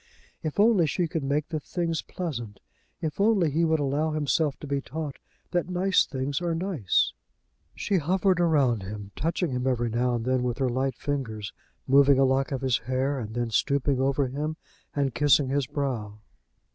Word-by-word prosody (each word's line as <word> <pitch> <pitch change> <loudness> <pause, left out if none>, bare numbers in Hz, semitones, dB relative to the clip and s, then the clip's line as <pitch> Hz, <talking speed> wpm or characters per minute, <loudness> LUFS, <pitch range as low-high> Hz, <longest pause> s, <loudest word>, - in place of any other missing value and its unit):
If 155 +2 -4
only 205 -6 +5
she 175 +3 0
could 160 0 -2
make 145 +2 -1
the 160 -2 -2
things 165 +1 -2
pleasant! 120 - -5 0.4
If 160 +4 -2
only 200 -7 +3
he 165 +4 +1
would 160 -1 +2
allow 145 +3 0
himself 150 0 +1
to - - -8
be 140 -1 -1
taught 150 0 -6 0.3
that 175 0 0
nice 185 +1 +2
things 135 +2 -2
are 170 -2 0
nice! 165 - +1 0.6
She 200 - 0
hovered 185 +3 +2
around 140 - +3
him, 100 +1 -7
touching 165 +1 -1
him 125 +1 -1
every 120 -3 0
now 120 +2 +1
and 115 -1 -3
then 130 0 +1
with 125 -1 -1
her 130 -2 +1
light 130 +1 -1
fingers, 115 -9 -4 0.3
moving 140 0 +5
a 135 - +5
lock 135 +1 +1
of 135 -1 -2
his 130 -3 +1
hair, 130 +2 -1
and 110 -1 -6
then 120 -1 -1
stooping 140 +3 +1
over 135 +1 +2
him 150 +4 -3 0.4
and 140 -3 0
kissing 145 -2 +4
his 140 -1 0
brow. 130 -8 -3
140 Hz, 185 wpm, -27 LUFS, 130-160 Hz, 0.6 s, only